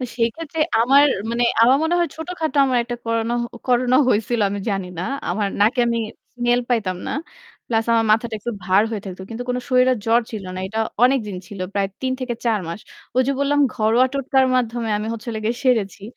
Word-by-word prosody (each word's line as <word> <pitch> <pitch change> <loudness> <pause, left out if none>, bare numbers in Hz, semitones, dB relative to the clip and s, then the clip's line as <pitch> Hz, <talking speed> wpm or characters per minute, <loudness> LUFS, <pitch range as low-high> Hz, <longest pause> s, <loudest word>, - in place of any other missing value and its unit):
তো - - -2
সেই 230 0 +3
ক্ষেত্রে 325 -1 -5 0.2
আমার 275 +5 +6 0.2
মানে 240 +1 +1 0.2
আমার 250 +3 +6
মনে 320 +2 +1
হয় 345 -1 +1
ছোটখাটো 320 -2 -3 0.2
একটা 240 0 -5
করোনা 230 +1 0 0.3
করোনা 250 0 +3
হয়ছিল 225 +1 +1
আমি 205 - -3
জানি 195 -2 -2
না। - - -2 0.3
আমার 200 +3 0
নাকে 230 +5 +3
আমি 235 0 0 0.4
স্মেল 240 0 +2
পাইতাম 215 -7 0
না। - - -2 0.5
প্লাস 225 -1 0
আমার 225 -1 +3
মাথাটা 225 +1 0
একটু 225 +3 -4
ভার 190 +2 +4
হয়ে 220 -3 -3
থাকত। 190 -1 -8
কিন্তু 230 +2 -5
কোন 250 - 0
শরীরের 255 -1 +4
জ্বর 230 +1 +4
ছিল 215 -4 -6
না। - - -5
এটা 220 +3 -3 0.2
অনেকদিন 240 -7 +1
ছিল। 200 -2 -9
প্রায় 200 -1 0
৩ 260 0 0
থেকে 250 -2 -2
৪ 225 -3 +1
মাস। 170 - -5 0.4
ঐ - - +1
যে 275 - +2
বললাম 290 +1 +2
ঘরোয়া 225 +4 +3
টোটকার 270 -1 +2
মাধ্যমে 235 -2 0
আমি 210 - -4
হচ্ছেলো 230 0 -5
গিয়ে 235 +2 0
সেরেছি। 220 -6 +1
235 Hz, 195 wpm, -21 LUFS, 215-255 Hz, 0.5 s, আমার